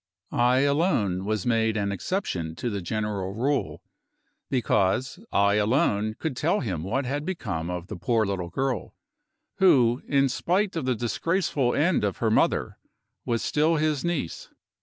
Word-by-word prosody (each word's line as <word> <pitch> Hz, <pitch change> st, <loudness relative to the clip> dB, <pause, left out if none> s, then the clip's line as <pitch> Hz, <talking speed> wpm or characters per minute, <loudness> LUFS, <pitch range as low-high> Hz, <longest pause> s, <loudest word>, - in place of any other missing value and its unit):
I 125 Hz, +2 st, +3 dB
alone 140 Hz, -, +1 dB
was 110 Hz, -1 st, -1 dB
made 115 Hz, -2 st, +1 dB
an 100 Hz, -1 st, 0 dB
exception 95 Hz, -, -3 dB
to 120 Hz, +7 st, -3 dB
the 100 Hz, -1 st, -3 dB
general 100 Hz, 0 st, -3 dB
rule, 135 Hz, +5 st, -1 dB, 0.7 s
because 125 Hz, -, +1 dB
I 100 Hz, +1 st, +3 dB
alone 110 Hz, -1 st, +1 dB
could 160 Hz, -5 st, -3 dB
tell 170 Hz, +11 st, +1 dB
him 90 Hz, -, -3 dB
what 125 Hz, +9 st, -1 dB
had 145 Hz, +3 st, -2 dB
become 105 Hz, -, -3 dB
of 90 Hz, -1 st, -4 dB
the 105 Hz, -, -7 dB
poor 110 Hz, +5 st, +1 dB
little 95 Hz, -3 st, -3 dB
girl, 130 Hz, +7 st, -2 dB, 0.6 s
who 130 Hz, -11 st, +4 dB
in 140 Hz, -1 st, +3 dB
spite 185 Hz, +9 st, 0 dB
of 160 Hz, -5 st, -2 dB
the 130 Hz, -1 st, +1 dB
disgraceful 135 Hz, -, 0 dB
end 165 Hz, -, +2 dB
of 100 Hz, -2 st, -1 dB
her 110 Hz, -2 st, 0 dB
mother -, -, +1 dB, 0.5 s
was 115 Hz, -1 st, -1 dB
still 155 Hz, +2 st, +2 dB
his 155 Hz, -2 st, 0 dB
niece. 170 Hz, -, -3 dB
120 Hz, 155 wpm, -26 LUFS, 100-145 Hz, 0.7 s, who